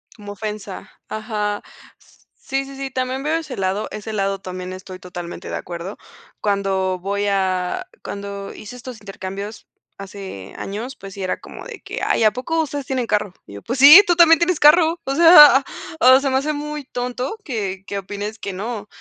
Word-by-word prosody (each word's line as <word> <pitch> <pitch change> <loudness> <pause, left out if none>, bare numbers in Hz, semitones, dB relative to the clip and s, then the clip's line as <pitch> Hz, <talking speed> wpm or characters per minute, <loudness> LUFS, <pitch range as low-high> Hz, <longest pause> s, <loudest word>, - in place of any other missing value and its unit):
Como 205 -1 -9
ofensa. 210 -2 -7 0.2
Ajá. 210 -1 -3 0.4
S - - -26
sí, 270 0 -3
sí, 275 0 -10
sí, 270 0 -5
también 255 +1 -2
veo 305 +2 0
ese 300 -7 -6
lado. 195 +2 -1
Ese 215 +1 -6
lado 195 -1 -1
también 185 -1 -7
estoy 185 0 -9
totalmente 175 -1 -8
de - - -3
acuerdo. 175 +3 -6 0.4
Cuando 195 -2 0
voy 200 +2 -2
a 190 - -1 0.2
cuando 200 0 -6
hice 235 +4 -10
estos 250 -1 -9
intercambios 200 +1 -7 0.3
hace 195 - -9
años, 225 +7 -5
pues 195 -4 -11
sí 195 - -5
era 185 - -2
como - - -11
de - - -9
que: - - -6
"Ay, - - +2
¿a 215 - +6
poco 320 +8 -1
ustedes 290 -3 -4
tienen 255 -3 -2
carro?" 210 -3 0
Y - - -12
yo: 100 - -9
"Pues 245 +3 -3
sí, 300 +9 +11
tú 350 - +2
también 330 -1 +7
tienes 345 -1 +1
carro. 325 +2 +5
O 275 - -1
sea, 300 -5 +9 0.4
o 260 -3 +7
se 275 0 -1
me 260 - +2
hace 300 +3 -1
muy 300 0 -5
tonto 250 - -4
que, 200 - -4
qué 200 - -4
opines 205 +3 -6
que 200 -2 -6
no". 210 +2 -5
215 Hz, 190 wpm, -21 LUFS, 195-270 Hz, 0.4 s, sí